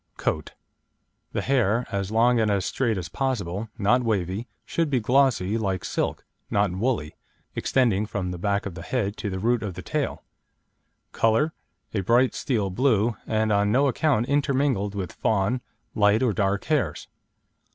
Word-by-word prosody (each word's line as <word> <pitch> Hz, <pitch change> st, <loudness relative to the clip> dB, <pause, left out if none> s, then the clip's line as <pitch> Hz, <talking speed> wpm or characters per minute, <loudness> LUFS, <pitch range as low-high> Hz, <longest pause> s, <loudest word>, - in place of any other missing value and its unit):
COAT 75 Hz, -1 st, -2 dB, 0.8 s
The -, -, -1 dB
hair, 120 Hz, -3 st, +2 dB
as 100 Hz, -1 st, -2 dB
long 115 Hz, +2 st, +3 dB
and 110 Hz, -1 st, +2 dB
as 100 Hz, -2 st, +1 dB
straight 115 Hz, -5 st, 0 dB
as 90 Hz, -2 st, -4 dB
possible 105 Hz, -3 st, -2 dB
(not 115 Hz, +5 st, +3 dB
wavy), 100 Hz, 0 st, -1 dB, 0.2 s
should 165 Hz, -2 st, 0 dB
be 130 Hz, -3 st, +2 dB
glossy, 115 Hz, -4 st, +2 dB
like 95 Hz, -4 st, -2 dB
silk -, -, -2 dB, 0.2 s
(not 100 Hz, -2 st, +2 dB
woolly), 95 Hz, -, -1 dB, 0.4 s
extending 110 Hz, -6 st, +1 dB
from 95 Hz, -4 st, -3 dB
the 90 Hz, -, -6 dB
back 100 Hz, +2 st, 0 dB
of 100 Hz, -, -4 dB
the 85 Hz, -, -8 dB
head 105 Hz, +1 st, -2 dB
to 105 Hz, -, -3 dB
the 95 Hz, -, -3 dB
root 115 Hz, +4 st, +1 dB
of 100 Hz, -5 st, -4 dB
the -, -, -7 dB
tail; -, -, -2 dB, 0.9 s
colour, 115 Hz, +8 st, +2 dB, 0.4 s
a 105 Hz, -, 0 dB
bright 120 Hz, +6 st, +3 dB
steel 105 Hz, -7 st, -1 dB
blue, 115 Hz, 0 st, +2 dB
and 110 Hz, 0 st, +1 dB
on 100 Hz, 0 st, +3 dB
no 135 Hz, +5 st, +4 dB
account 135 Hz, -3 st, +2 dB
intermingled 135 Hz, -7 st, +1 dB
with 95 Hz, -4 st, -3 dB
fawn, 110 Hz, +4 st, 0 dB, 0.3 s
light 105 Hz, +2 st, +3 dB
or 120 Hz, -4 st, +2 dB
dark 100 Hz, 0 st, 0 dB
hairs. 130 Hz, -, -1 dB
110 Hz, 160 wpm, -25 LUFS, 100-125 Hz, 0.9 s, no